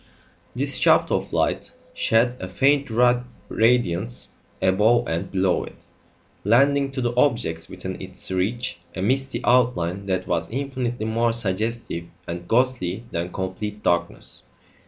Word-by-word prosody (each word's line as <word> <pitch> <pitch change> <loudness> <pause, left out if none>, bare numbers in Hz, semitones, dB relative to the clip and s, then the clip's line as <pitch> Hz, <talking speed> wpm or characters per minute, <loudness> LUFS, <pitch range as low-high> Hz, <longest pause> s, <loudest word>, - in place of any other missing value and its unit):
This - - +1
shaft - - +4
of - - -1
light - - 0 0.2
shed 120 - +2
a 95 - -5
faint 140 +8 +2 0.6
radiance 115 -1 +1 0.3
above 105 +6 +3
and 85 +3 -2
below 95 -1 +1
it, - - -11 0.7
lending 140 +6 +4
to 130 - -2
the 120 -1 0
objects 115 - +1
within 95 0 -6
its 95 0 -4
reach 95 0 -1 0.2
a 95 - -3
misty 130 +2 0
outline 100 -7 +2
that 95 -1 -1
was 85 -2 -1
infinitely 125 -3 -3
more 115 +1 +1
suggestive 110 -4 -2 0.2
and 85 +1 -5
ghostly 115 -5 +1
than 85 +1 -3
complete 100 +3 -5
darkness. 85 - -1
110 Hz, 130 wpm, -23 LUFS, 95-125 Hz, 0.7 s, shaft